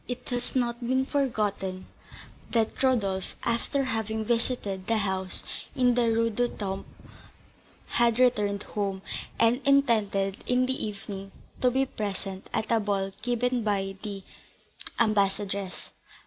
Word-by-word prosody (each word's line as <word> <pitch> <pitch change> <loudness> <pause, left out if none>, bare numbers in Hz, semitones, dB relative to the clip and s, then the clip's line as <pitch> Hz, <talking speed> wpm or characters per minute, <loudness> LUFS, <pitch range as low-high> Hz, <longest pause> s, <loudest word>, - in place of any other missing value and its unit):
It 250 0 -5
has 245 +1 -1
not 240 -2 +1
been 260 +2 +1
forgotten 210 -9 -1 0.6
that 225 -2 0
Rodolph, 205 -8 +1
after 235 +4 +1
having 220 -3 -1
visited 230 -5 -1
the 230 - +3
house 190 -2 -1 0.3
in 250 -1 +4
the 235 -1 +3
Rue 230 0 +2
du 245 +3 +1
Temple, 195 -4 -4 1.0
had 235 -1 +4
returned 210 -5 +3
home, 195 -2 -3 0.4
and 230 +3 +4
intended, 215 -8 +3
in 250 0 +3
the 260 -3 0
evening, 195 -1 -7 0.3
to 250 - +5
be 265 +2 +2
present 195 -5 -5
at 220 - -1
a 230 - +5
ball 200 -2 0
given 245 0 +1
by 195 -2 0
the 200 -2 -4 0.8
ambassadress. 200 -3 +1
220 Hz, 130 wpm, -28 LUFS, 195-245 Hz, 1.0 s, to